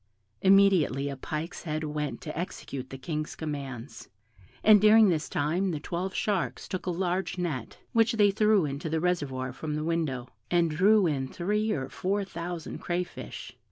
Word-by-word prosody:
Immediately 190 Hz, -8 st, +4 dB
a 140 Hz, -, -4 dB
pike's 155 Hz, +5 st, -5 dB
head 155 Hz, -1 st, -3 dB
went 150 Hz, -4 st, -3 dB
to 155 Hz, -, -6 dB
execute 140 Hz, -6 st, -5 dB
the 135 Hz, -, -7 dB
King's 155 Hz, +2 st, -4 dB
commands, 140 Hz, -5 st, -6 dB, 0.5 s
and 215 Hz, -2 st, +7 dB
during 215 Hz, 0 st, +7 dB
this 155 Hz, -4 st, 0 dB
time 170 Hz, +7 st, 0 dB
the 160 Hz, -4 st, -2 dB
twelve 180 Hz, +5 st, -4 dB
sharks 200 Hz, -5 st, -1 dB
took 185 Hz, -1 st, -5 dB
a -, -, +2 dB
large 180 Hz, +1 st, -1 dB
net, 155 Hz, -9 st, -3 dB, 0.2 s
which 230 Hz, +1 st, +4 dB
they 205 Hz, -2 st, +4 dB
threw 210 Hz, -3 st, +3 dB
into 140 Hz, +2 st, -4 dB
the 160 Hz, +1 st, 0 dB
reservoir 145 Hz, -7 st, -1 dB
from 150 Hz, -1 st, -4 dB
the 150 Hz, -, -2 dB
window, 155 Hz, -7 st, -1 dB, 0.2 s
and 170 Hz, -2 st, +2 dB
drew 200 Hz, +5 st, +4 dB
in 140 Hz, -5 st, 0 dB
three 210 Hz, +8 st, -1 dB
or 130 Hz, -8 st, -2 dB
four 200 Hz, +6 st, -1 dB
thousand 170 Hz, -2 st, -6 dB
crayfish. 175 Hz, 0 st, -5 dB
170 Hz, 165 wpm, -28 LUFS, 150-190 Hz, 0.5 s, and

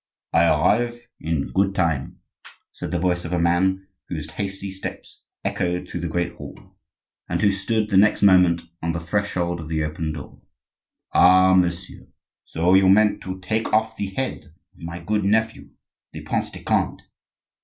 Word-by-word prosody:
"I 85 Hz, -, +5 dB
arrive 120 Hz, +10 st, +1 dB
in 80 Hz, -3 st, -2 dB
good 95 Hz, 0 st, +1 dB
time," 80 Hz, -7 st, -1 dB, 0.5 s
said -, -, -7 dB
the 90 Hz, -, -1 dB
voice 90 Hz, 0 st, 0 dB
of 85 Hz, -, -5 dB
a -, -, +1 dB
man 95 Hz, +3 st, +1 dB, 0.2 s
whose 80 Hz, -2 st, -5 dB
hasty 100 Hz, +1 st, -5 dB
steps 95 Hz, 0 st, -8 dB, 0.2 s
echoed 90 Hz, 0 st, -1 dB
through -, -, -5 dB
the 85 Hz, -, -3 dB
great 85 Hz, +1 st, -2 dB
hall, -, -, -12 dB, 0.5 s
and -, -, -1 dB
who 100 Hz, -2 st, +3 dB
stood 105 Hz, +3 st, -1 dB
the 95 Hz, -, +4 dB
next 105 Hz, +1 st, +4 dB
moment 90 Hz, -4 st, +5 dB, 0.2 s
on 85 Hz, 0 st, -1 dB
the 85 Hz, -, -3 dB
threshold 85 Hz, -1 st, -2 dB
of 80 Hz, -1 st, -8 dB
the 80 Hz, -1 st, -1 dB
open 80 Hz, +1 st, -3 dB
door. 75 Hz, -3 st, -10 dB, 0.7 s
"Ah, 95 Hz, +1 st, +6 dB
messieurs, 90 Hz, 0 st, -1 dB, 0.4 s
so 85 Hz, +3 st, +1 dB
you 95 Hz, 0 st, +5 dB
meant 105 Hz, +2 st, +4 dB
to 95 Hz, 0 st, -6 dB
take 110 Hz, +5 st, -2 dB
off 110 Hz, +1 st, +2 dB
the 100 Hz, -, -3 dB
head 130 Hz, +7 st, -4 dB, 0.3 s
of -, -, -25 dB
my 85 Hz, +1 st, -6 dB
good 105 Hz, +4 st, -1 dB
nephew, 110 Hz, +2 st, 0 dB, 0.4 s
the -, -, -7 dB
Prince -, -, -2 dB
de -, -, -11 dB
Conde? -, -, 0 dB
95 Hz, 170 wpm, -23 LUFS, 85-100 Hz, 0.7 s, Ah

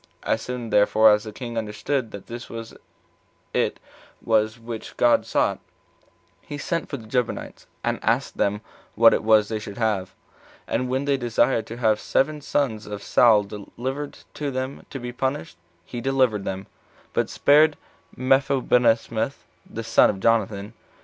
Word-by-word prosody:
As 110 Hz, -, 0 dB
soon 125 Hz, -2 st, -5 dB
therefore 110 Hz, +1 st, +5 dB
as 105 Hz, +1 st, +2 dB
the 110 Hz, -, -6 dB
king 120 Hz, +1 st, -4 dB
understood 115 Hz, +4 st, -2 dB
that 100 Hz, -2 st, -9 dB
this 120 Hz, +1 st, -8 dB, 1.0 s
it -, -, 0 dB, 0.4 s
was 110 Hz, 0 st, +1 dB
which 115 Hz, -1 st, -8 dB
God 120 Hz, -1 st, +3 dB
sought, -, -, +1 dB, 0.8 s
he 145 Hz, -, -7 dB
sent 165 Hz, +3 st, -2 dB
for 140 Hz, -, -3 dB
the 115 Hz, -, -12 dB
Gibeonites, 125 Hz, +1 st, -3 dB, 0.2 s
and -, -, -1 dB
asked -, -, 0 dB
them 105 Hz, +1 st, 0 dB, 0.3 s
what 115 Hz, 0 st, +7 dB
it -, -, 0 dB
was 110 Hz, -1 st, +5 dB
they 110 Hz, 0 st, -3 dB
should 105 Hz, 0 st, -8 dB
have; 105 Hz, -5 st, -1 dB, 0.5 s
and 125 Hz, -, -1 dB
when 130 Hz, +2 st, -1 dB
they 140 Hz, -1 st, +2 dB
desired 120 Hz, -1 st, +1 dB
to 115 Hz, -, -7 dB
have 110 Hz, -3 st, +2 dB
seven 150 Hz, +2 st, 0 dB
sons 125 Hz, -7 st, -1 dB
of 105 Hz, -1 st, -6 dB
Saul 110 Hz, -4 st, +5 dB
delivered 125 Hz, +8 st, -6 dB, 0.2 s
to 145 Hz, -1 st, -3 dB
them 130 Hz, +1 st, -5 dB
to 135 Hz, -, -6 dB
be 120 Hz, 0 st, -5 dB
punished, 135 Hz, +6 st, -3 dB, 0.3 s
he 120 Hz, -, -6 dB
delivered 130 Hz, -6 st, +1 dB
them 95 Hz, 0 st, -3 dB
up, 95 Hz, -, -17 dB, 0.5 s
but -, -, 0 dB
spared 150 Hz, +1 st, +4 dB, 0.4 s
Mephibosheth 130 Hz, -2 st, +2 dB, 0.2 s
the 115 Hz, -, -5 dB
son 115 Hz, +1 st, +5 dB
of 95 Hz, -, -2 dB
Jonathan. 105 Hz, -1 st, +1 dB
115 Hz, 155 wpm, -24 LUFS, 110-130 Hz, 1.0 s, what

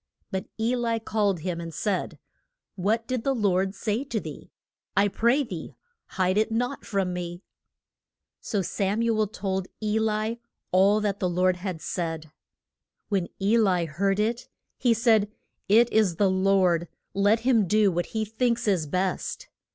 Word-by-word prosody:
But 190 Hz, -1 st, -3 dB
E 230 Hz, +3 st, +1 dB
li 230 Hz, -2 st, 0 dB
called 205 Hz, -5 st, 0 dB
him 170 Hz, 0 st, -3 dB
and 165 Hz, 0 st, -6 dB
said, 185 Hz, +4 st, -2 dB, 0.6 s
What 215 Hz, +5 st, 0 dB
did 255 Hz, -2 st, -2 dB
the 270 Hz, -1 st, +1 dB
Lord 195 Hz, -3 st, +1 dB
say 215 Hz, +5 st, -1 dB
to 235 Hz, -5 st, -2 dB
thee? -, -, -9 dB, 0.5 s
I 200 Hz, +1 st, +5 dB
pray 235 Hz, +8 st, +2 dB
thee 180 Hz, -10 st, -7 dB, 0.4 s
hide 185 Hz, +2 st, +2 dB
it 220 Hz, +1 st, +1 dB
not 245 Hz, +4 st, -1 dB
from 195 Hz, -3 st, -1 dB
me. 175 Hz, +1 st, -5 dB, 1.0 s
So 205 Hz, -4 st, -2 dB
Sam 200 Hz, +5 st, -1 dB
u 230 Hz, -1 st, +2 dB
el 215 Hz, -, +2 dB
told 190 Hz, -2 st, -3 dB
E 215 Hz, 0 st, 0 dB
li 220 Hz, +1 st, -1 dB, 0.3 s
all 200 Hz, +3 st, +4 dB
that 205 Hz, -1 st, -1 dB
the 185 Hz, -4 st, 0 dB
Lord 180 Hz, +1 st, +2 dB
had 180 Hz, -3 st, -5 dB
said. 165 Hz, -3 st, -3 dB, 0.8 s
When 195 Hz, -4 st, 0 dB
E 210 Hz, +4 st, +3 dB
li 185 Hz, -5 st, +2 dB
heard 195 Hz, +6 st, 0 dB
it, 230 Hz, +3 st, -1 dB, 0.3 s
he 240 Hz, -3 st, +3 dB
said, 220 Hz, -2 st, +3 dB, 0.4 s
It 230 Hz, +4 st, +5 dB
is 210 Hz, -6 st, +3 dB
the 195 Hz, +2 st, +3 dB
Lord, 185 Hz, -3 st, +2 dB, 0.3 s
let 205 Hz, +3 st, +3 dB
him 230 Hz, -5 st, +3 dB
do 210 Hz, +1 st, +4 dB
what 175 Hz, 0 st, -1 dB
he 220 Hz, -1 st, -2 dB
thinks 235 Hz, +2 st, 0 dB
is 180 Hz, -7 st, +1 dB
best. 185 Hz, +4 st, -2 dB
200 Hz, 165 wpm, -26 LUFS, 185-225 Hz, 1.0 s, I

